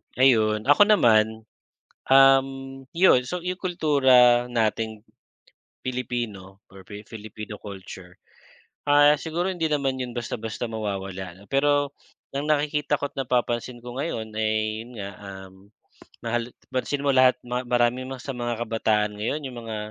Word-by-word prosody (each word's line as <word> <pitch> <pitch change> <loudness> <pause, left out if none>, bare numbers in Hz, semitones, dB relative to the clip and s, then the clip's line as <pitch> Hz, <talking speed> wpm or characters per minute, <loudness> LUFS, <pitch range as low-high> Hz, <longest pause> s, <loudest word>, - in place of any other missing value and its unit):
Ayun. 110 -5 +3
Ako 145 - +5
naman, 110 - +4 0.6
um, 135 0 +6 0.5
yun 165 -8 +5
so 180 +2 -4
yung 180 +1 -3
kultura 130 -8 +4
nating 110 -2 -1 0.8
Pilipino 115 -6 -4
or 95 -1 -14
Fi 105 0 -9
Filipino 105 -1 -9
culture, 95 -3 -10 0.7
ah 145 +1 +6
siguro 170 +3 -2
hindi 170 -3 -1
naman 140 -3 -1
yun 125 -1 -5
basta-basta 115 -1 -4
mawawala 95 -4 -5
'no. - - -15
Pero 145 0 +2 0.4
ang 140 +2 -3
nakikita 150 0 +1
ko't 145 - -5
napapansin 120 -1 -1
ko 120 0 -8
ngayon, 110 -8 -3
ay 110 0 0
yun 125 - -14
nga, 100 -1 -5
um, 95 -1 -10 0.7
mahal 120 +1 -2 0.2
pansin 140 +2 -1
mo 140 - +1
lahat 130 0 +5
ma 125 +1 -2
marami 120 +1 +1
ma 130 0 -7
sa 135 +1 -6
mga 120 -1 -3
kabataan 110 -2 0
ngayon 110 +9 -2
yung 125 -2 -6
mga 110 -1 -5
120 Hz, 140 wpm, -25 LUFS, 110-135 Hz, 0.8 s, um